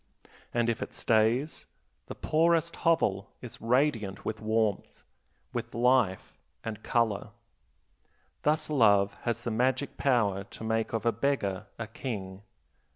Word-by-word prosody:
And 120 -1 +1
if 115 -1 -1
it - - -5
stays, 115 +6 +1 0.4
the - - -7
poorest 165 +1 +2
hovel 105 - +1
is 125 - -10
radiant 115 -5 +1
with 110 - -3
warmth, 110 -2 -1 0.5
with - - -4
life 120 -5 +2 0.2
and 110 -1 -5
color. 115 -4 0 1.1
Thus 155 +1 +1
love 100 -7 +4
has 120 -1 -1
the 120 - -2
magic 130 +4 0
power 105 -8 +2
to 100 - -11
make 110 0 0
of 115 -1 -2
a 115 - +4
beggar 105 -5 -1
a 115 - -4
king. 100 -5 -6
115 Hz, 130 wpm, -29 LUFS, 105-130 Hz, 1.1 s, love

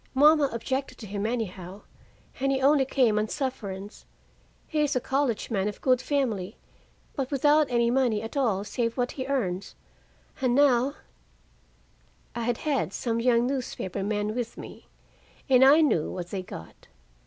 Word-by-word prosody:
Mama 295 +1 +5
objected 260 +4 -3
to 220 - -9
him, 205 +1 -3
anyhow, 200 -5 -5 0.6
and 275 +1 +1
he 270 - +1
only 275 0 +4
came 240 -5 +2
on 215 - 0
sufferance. 210 -7 -5 0.6
He 310 - -3
is 295 -1 +1
a - - +3
college 265 -3 -1
man 200 -2 0
of 210 - -5
good 255 -1 +2
family, 225 -9 -2 0.6
but 265 -2 -2
without 295 +2 +3
any 235 -1 +2
money 240 -5 +1
at 225 - -7
all 220 -8 +1
save 230 +2 -2
what 245 -1 0
he 260 -1 -5
earns.. 200 -9 -2 0.7
And 250 -2 +2
now 275 -1 +3 0.7
" - - -36
I 235 -1 -2
had 240 -1 0
had 290 -4 -1
some 230 -2 -2
young 240 0 +3
newspaper 250 -8 -3
men 210 +1 -1
with 235 -1 -4
me, - - -11 0.6
and 260 -2 +5
I 285 +4 +7
knew 225 - +2
what 175 -1 -6
they 195 - -3
got. 80 - -11
245 Hz, 165 wpm, -27 LUFS, 210-270 Hz, 0.7 s, I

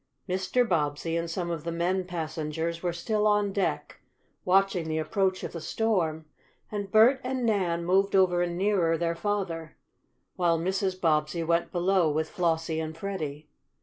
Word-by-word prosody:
Mr. 190 +7 +1
Bobbsey 160 -1 0
and 170 0 -2
some 170 0 -3
of 165 -3 -4
the 170 - -3
men 180 +3 0
passengers 165 -1 -3
were 175 - 0
still 210 +5 0
on 205 -1 +2
deck, 195 - -2 0.4
watching 185 -3 +2
the 155 - -1
approach 185 +4 0
of - - -4
the 165 - -6
storm, 165 -5 0 0.5
and 205 -2 -4
Bert 240 +5 +6
and 255 -1 -2
Nan 180 -6 0
moved 195 +3 +2
over 180 -2 +4
nearer 175 -2 +1
their 170 0 0
father, 170 -4 -3 0.6
while 170 -2 +2
Mrs. 190 +2 -1
Bobbsey 155 0 +1
went 170 +1 +1
below 180 -1 +2
with 155 +1 -1
Flossie 165 -2 0
and 160 0 -5
Freddie. 155 -6 -5
175 Hz, 155 wpm, -28 LUFS, 165-195 Hz, 0.6 s, Bert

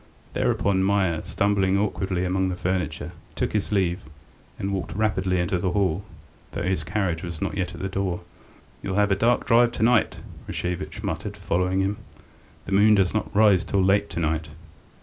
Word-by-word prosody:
Thereupon 95 -1 +1
Meier, 95 -5 +1
stumbling 100 -1 +1
awkwardly 95 -3 -1
among 95 +1 +1
the 90 - -2
furniture, 90 +1 -2 0.2
took - - -1
his 105 -1 -1
leave, 90 -6 0 0.5
and 100 +1 -2
walked 95 -2 -4
rapidly 95 -4 +1
into 85 +1 0
the 90 0 -1
hall, 95 -2 +1 0.5
though - - -3
his 90 -4 0
carriage 90 -1 -1
was 85 -3 -6
not - - -2
yet 90 -3 -2
at 85 - -8
the 95 - -1
door. 95 -2 -2 0.6
"You'll 95 -1 -3
have 105 0 +3
a - - +4
dark 115 +5 +2
drive 120 0 +4
to 110 - -1
night," 120 -2 +3 0.3
Rashevitch 90 -3 -4
muttered, 100 +6 -4
following 90 0 0
him. 100 +2 -1 0.7
"The - - -7
moon 105 +2 +6
does 95 -2 +2
not 110 -1 -2
rise 100 -4 +5
till 100 +1 +1
late 100 +2 +3
to - - -4
night." 80 0 -1
95 Hz, 180 wpm, -25 LUFS, 90-100 Hz, 0.7 s, moon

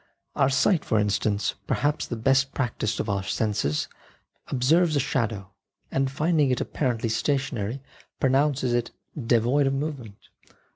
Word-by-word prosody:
Our 140 -2 +3
sight 155 +5 +2
for 110 - 0
instance, 105 0 0
perhaps 145 +1 0
the 120 - -3
best 135 +4 +2
practised 115 -4 -1
of - - -2
all 100 -1 0
our 95 - -4
senses, 100 -8 -1 0.6
observes 155 +6 +2
a - - +3
shadow, 110 -7 -2 0.4
and 135 0 +1
finding 155 0 +1
it 125 - +1
apparently 120 -5 -1
stationary 130 -1 -1 0.4
pronounces 135 -1 +2
it 120 -1 0 0.4
devoid 125 +5 +3
of 135 - +1
movement. 135 -8 -6
130 Hz, 140 wpm, -25 LUFS, 110-140 Hz, 0.6 s, Our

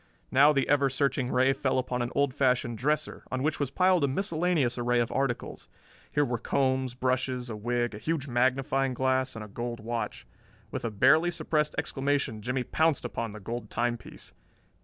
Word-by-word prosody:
Now 140 +3 +6
the 135 -3 +1
ever 140 -1 +3
searching 135 -1 0
ray 130 +2 +3
fell 135 -1 0
upon 125 -1 -1
an 120 +1 -2
old 140 -2 +2
fashioned 125 -3 +1
dresser, 150 +3 -1
on 130 0 -1
which 155 +1 0
was 145 -3 0
piled 185 +2 +3
a - - +4
miscellaneous 160 -5 0
array 120 0 +2
of 120 0 0
articles. 135 -3 -2 0.4
Here 145 - +2
were 120 -2 -2
combs, 130 -1 0
brushes, 130 -1 -1
a - - -4
wig, 120 +2 -1
a 105 - -7
huge 155 +1 -2
magnifying 130 +1 +1
glass, 130 0 0
and 110 -1 -6
a - - -11
gold 120 +3 -5
watch. 115 +1 -4 0.5
With - - -4
a 115 - -1
barely 155 +11 +4
suppressed 155 -2 -1
exclamation, 140 -5 -1
Jimmie 125 +3 -1
pounced 160 +2 +1
upon 115 - -3
the 105 +1 -9
gold 115 +2 -5
timepiece. 120 0 -4
130 Hz, 180 wpm, -28 LUFS, 120-140 Hz, 0.5 s, Now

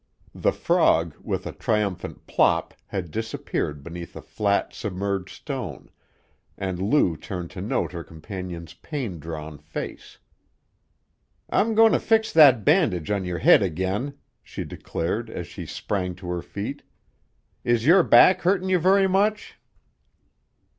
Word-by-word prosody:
The - - +1
frog, 80 -1 +2
with - - -3
a - - -4
triumphant 105 -4 -2
plop, - - +2
had 90 -5 -4
disappeared 90 -9 -3
beneath 85 +2 -8
a - - -7
flat, 100 -1 0
submerged 100 -1 -3
stone, - - -7 0.7
and 95 -2 -3
Lou 100 - +2
turned 90 +1 -6
to - - -7
note - - -1
her 85 - -6
companion's 85 -1 -8
pain 105 - -5
drawn 75 -1 -7
face. 75 +2 -7 1.3
"I'm 225 +1 +2
goin' 225 0 +7
to - - +3
fix 220 -1 +2
that 135 -9 +7
bandage 110 - +2
on 100 -2 0
your 90 -1 -3
head 80 - +6
again," 95 - -2 0.3
she - - -6
declared 110 +8 -4
as 90 - -5
she - - -9
sprang 90 -3 -3
to 90 0 -9
her 90 -1 -2
feet. - - -6 0.8
"Is 120 -1 +1
your 180 +5 +7
back 185 +2 +6
hurtin' 185 +1 +1
you 185 -1 +3
very 190 +3 +4
much?" 205 +3 0
100 Hz, 140 wpm, -24 LUFS, -, 1.3 s, goin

